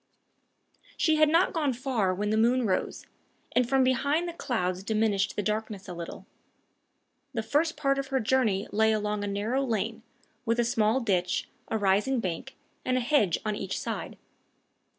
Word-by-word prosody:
She 315 -2 +3
had 305 -1 +5
not 335 +4 +3
gone 295 -5 +1
far 240 -6 0
when 205 +3 -1
the - - +2
moon 240 +3 +3
rose, 190 -3 -1 0.5
and 250 -1 +2
from 270 0 +4
behind 285 +6 +1
the 340 - -4
clouds 185 - -2
diminished 210 -1 0
the 205 - -1
darkness 210 -1 -3
a - - -6
little. 170 -1 -7 1.1
The 225 - -1
first 300 +7 +1
part 275 -2 +1
of 275 - -3
her 265 -1 0
journey 220 -5 +1
lay 220 +1 +3
along 210 -1 -1
a - - -2
narrow 215 +7 -1
lane, 220 -2 -2 0.4
with 230 +1 0
a 240 - +3
small 230 +1 +2
ditch, 180 -5 0 0.2
a 220 - -1
rising 210 +6 +2
bank, 190 +6 -4 0.3
and 255 0 +1
a - - +3
hedge 240 - +2
on 215 -1 0
each 195 -1 -3
side. - - -5
225 Hz, 170 wpm, -28 LUFS, 205-265 Hz, 1.1 s, had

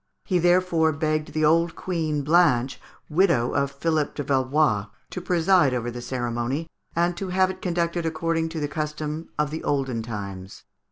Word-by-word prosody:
He 185 -3 +1
therefore 175 -2 +3
begged 155 0 -1
the 155 0 +1
old 165 +2 +3
Queen 160 -5 -2
Blanche, 145 -5 +3 0.3
widow 155 -8 +2
of 140 0 +1
Philippe 150 +1 -1
de 145 - -3
Valois, 130 -5 +1 0.2
to 180 - -5
preside 175 -5 +3
over 120 0 -2
the 120 +1 -7
ceremony, 120 +4 -2 0.3
and 175 +1 +1
to 195 - -4
have 185 +1 +2
it 185 - -11
conducted 170 -1 -1
according 165 0 -1
to 160 0 -5
the 145 - -1
custom 150 +1 -4
of 150 0 0
olden 135 -5 -1
times. 100 -4 -7
155 Hz, 160 wpm, -25 LUFS, 135-170 Hz, 0.3 s, therefore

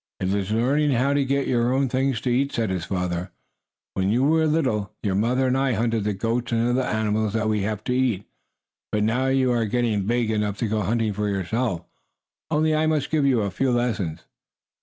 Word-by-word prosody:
"It 95 +1 -1
is 100 -1 -1
learning 135 +7 +2
how 130 +4 +2
to 140 0 +2
get 140 +1 0
your 120 0 +1
own 135 +1 +2
things 130 -1 0
to 125 - -1
eat," 135 +3 +1
said 110 -4 -1
his 90 -3 -2
father. 90 0 -2 0.6
"When 95 0 0
you 120 +4 +2
were 160 +2 +3
little, 110 -10 0
your 100 -3 0
mother 120 +6 +1
and 130 0 +2
I 135 -1 +1
hunted 115 -1 0
the 105 - 0
goats 115 +4 -2
and 115 0 +1
other 125 +2 +2
animals 110 -3 0
that 110 -1 0
we 105 -1 +1
have 105 +1 -3
to 125 - -1
eat. 125 -6 0 0.7
But 105 0 +1
now 125 +5 +1
you 130 -1 +2
are 120 -2 +1
getting 110 -3 0
big 120 -1 +1
enough 105 -2 -1
to 115 - -1
go 110 0 0
hunting 110 +2 0
for 105 +1 -1
yourself. 100 -1 -2 0.6
Only 155 0 +2
I 155 +1 +2
must 155 -3 0
give 150 -3 +2
you 125 -4 +3
a 100 -2 -2
few 130 +8 0
lessons." 110 -10 -1
115 Hz, 215 wpm, -24 LUFS, 105-130 Hz, 0.7 s, were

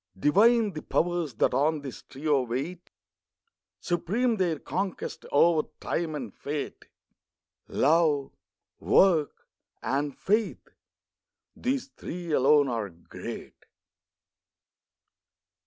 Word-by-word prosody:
Divine 210 - +4
the 155 - -5
Powers 170 -6 -1
that - - +2
on 150 +3 +2
this 135 -3 -8
trio 145 0 0
wait. 135 +9 -4 0.9
Supreme 215 +8 0
their 175 -5 +1
conquest, 185 +6 -4
over 155 +1 +4
Time 165 -2 -2
and 125 -8 -6
Fate. 145 0 -5 0.8
Love, 150 -2 +2 0.5
Work, 165 -6 +3 0.4
and 140 +1 -1
Faith—these 240 +5 -4
three 175 -8 -7
alone 145 +1 +5
are 115 -5 -2
great. 85 -1 -9
155 Hz, 90 wpm, -27 LUFS, 140-180 Hz, 0.9 s, alone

